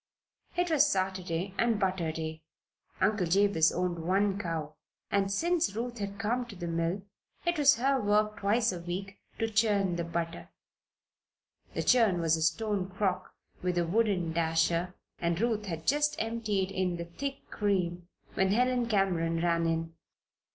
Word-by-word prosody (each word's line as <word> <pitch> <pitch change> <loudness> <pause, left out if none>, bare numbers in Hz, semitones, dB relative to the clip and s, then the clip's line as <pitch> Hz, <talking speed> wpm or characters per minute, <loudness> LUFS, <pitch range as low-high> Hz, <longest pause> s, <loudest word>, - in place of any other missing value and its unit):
It 355 -1 +1
was 300 -1 +5
Saturday, 185 -1 -2
and 230 -3 +2
butter 185 -4 0
day. 160 0 -5 0.6
Uncle 190 -1 +2
Jabez 185 -3 +4
owned 180 -1 -1
one 195 +4 +1
cow, 165 -5 -3 0.4
and 195 -1 +1
since 335 - +1
Ruth 240 +1 -4
had 200 0 -4
come 230 +3 0
to 215 - -10
the 175 -1 -6
mill 170 +3 -1 0.4
it 345 -2 +1
was 290 0 +6
her 270 +2 +1
work 210 +1 +2
twice 220 +3 +2
a 180 - -5
week 185 +3 -5 0.2
to 225 - 0
churn 205 -5 +2
the 170 - -1
butter. 170 0 -4 1.3
The - - -1
churn 225 -8 +4
was 165 -1 +3
a 160 - -3
stone 190 +4 0
crock 185 -1 -2 0.3
with 180 -1 -1
a 175 - +2
wooden 185 -3 +1
dasher 165 +2 +1 0.2
and 170 0 0
Ruth 220 -2 0
had 165 -3 -5
just 295 +2 +2
emptied 215 -4 -1
in 185 -2 -1
the 170 - -5
thick 275 +11 -6
cream 180 -4 -1 0.3
when 190 0 +2
Helen 250 +1 +2
Cameron 175 -6 +1
ran 170 -1 +1
in. 165 0 -1
190 Hz, 160 wpm, -30 LUFS, 170-220 Hz, 1.3 s, was